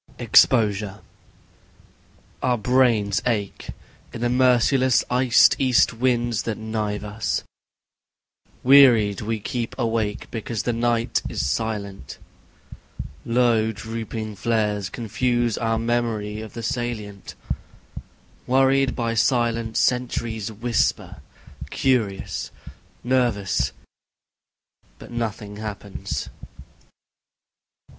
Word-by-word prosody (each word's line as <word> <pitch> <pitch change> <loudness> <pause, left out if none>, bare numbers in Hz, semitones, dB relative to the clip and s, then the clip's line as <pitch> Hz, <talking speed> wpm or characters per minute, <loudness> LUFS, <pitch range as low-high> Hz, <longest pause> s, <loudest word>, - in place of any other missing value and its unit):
Exposure 105 -4 +3 1.4
I - - -1
Our 125 -1 +2
brains 115 -4 +2
ache, 105 -5 -2 0.4
in 115 - -7
the 120 - +1
merciless 130 +1 +3
iced 125 -1 +5
east 130 -4 +3
winds 120 -1 0
that 115 -2 -3
knife 110 -2 -3
us... 105 +1 -2 1.2
Wearied 120 -7 +6
we 110 +1 -2
keep 115 +2 -4
awake 110 -3 -1
because 115 -1 -4
the 120 - 0
night 115 0 0
is - - -2
silent... 100 - -3 1.1
Low 115 -2 +2
drooping 110 -1 -6
flares 105 -2 0
confuse 120 0 -1
our 115 -1 0
memory 115 -3 -1
of 110 - -9
the 115 - -7
salient... 110 -4 -4 1.1
Worried 135 +1 +3
by 115 -2 -1
silence, 115 -1 +1
sentries 115 -3 -1
whisper, 115 +1 -1 0.5
curious, 115 -7 -1 0.5
nervous, 120 -7 +1 1.3
But - - -13
nothing 110 -3 -4
happens. 105 -2 -5
115 Hz, 90 wpm, -23 LUFS, 105-120 Hz, 1.4 s, Wearied